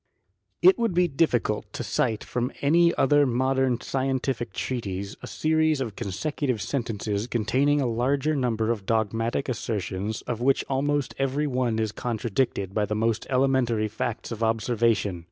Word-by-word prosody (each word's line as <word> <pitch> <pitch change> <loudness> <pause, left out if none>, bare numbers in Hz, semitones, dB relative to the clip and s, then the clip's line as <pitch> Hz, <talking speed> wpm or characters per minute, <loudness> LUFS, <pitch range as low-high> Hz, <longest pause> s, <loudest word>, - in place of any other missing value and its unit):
It 375 +1 +7
would 230 -6 0
be 180 0 +4
difficult 135 -8 0
to - - -4
cite 110 -2 0
from 125 +2 -2
any 170 +4 +4
other 145 +1 +4
modern 130 0 +1
scientific 130 -2 -1
treatise 100 -6 -4
a - - -7
series 155 -1 +1
of 115 -6 -3
consecutive 125 - -2
sentences 105 -2 -2
con 120 -3 -1
taining 140 +5 +2
a - - +1
larger 135 +6 +1
number 115 -4 0
of 105 -5 -4
dogmatic 115 +3 0
assertions, 105 -3 -3
of 120 -1 -4
which 135 +2 +2
almost 140 0 0
every 135 +2 0
one 125 -5 0
is 110 -1 0
contradicted 110 -3 -2
by 105 0 +1
the 105 - -2
most 115 +1 0
elementary 130 -4 +2
facts 115 +2 -4
of 115 -1 -5
observation. 115 -4 +1
120 Hz, 155 wpm, -26 LUFS, 110-135 Hz, -, It